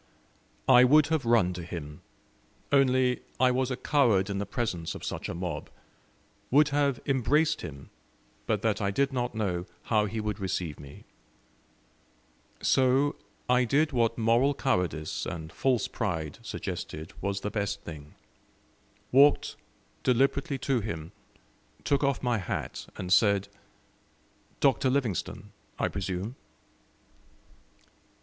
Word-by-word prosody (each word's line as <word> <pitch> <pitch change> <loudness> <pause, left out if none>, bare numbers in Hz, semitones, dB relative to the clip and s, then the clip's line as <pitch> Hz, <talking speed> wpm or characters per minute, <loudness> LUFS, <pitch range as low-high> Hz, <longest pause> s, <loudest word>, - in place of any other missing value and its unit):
I 125 -1 +8
would 145 +4 +5
have 155 -6 0
run 115 -6 +3
to 90 - -6
him, 80 -3 -7 0.7
only 130 -2 +3 0.2
I 130 0 +5
was 130 0 0
a 130 - -2
coward 115 -10 +2
in 100 - -2
the 100 - -3
presence 100 -8 -3
of - - -7
such - - -4
a - - -4
mob 85 -4 -4 0.8
would 150 +3 +5
have 140 -2 +1
embraced 150 +4 +2
him, 70 -3 -9 0.6
but - - 0
that - - +1
I 100 - +1
did 140 +7 0
not 125 -2 -2
know 90 -5 -2 0.2
how 110 -2 +2
he 110 +2 -4
would 105 -1 -3
receive 90 -5 -3
me; 70 0 -12 1.6
so 135 +2 +3 0.3
I 125 0 +4
did 150 +6 +2
what 115 -3 +1
moral 120 +5 +3
cowardice 90 - -1
and 80 -1 -6
false 125 -5 +1
pride 80 -9 -3
suggested 80 +1 -6
was 100 -1 -2
the 105 - -3
best 100 -2 -2
thing 75 -2 -10 1.0
walked 140 +3 +5 0.5
deliberately 135 +4 +1
to 135 -1 0
him, 85 -7 -5 0.7
took 140 0 +1
off 140 -2 0
my 120 -3 +1
hat, 95 - -4
and 90 0 0
said: 100 -1 +3 1.1
"DR. 140 -2 +6 0.2
LIVINGSTONE, 125 - -2 0.3
I - - +1
PRESUME?" 95 +4 -4
115 Hz, 130 wpm, -28 LUFS, 90-135 Hz, 1.6 s, I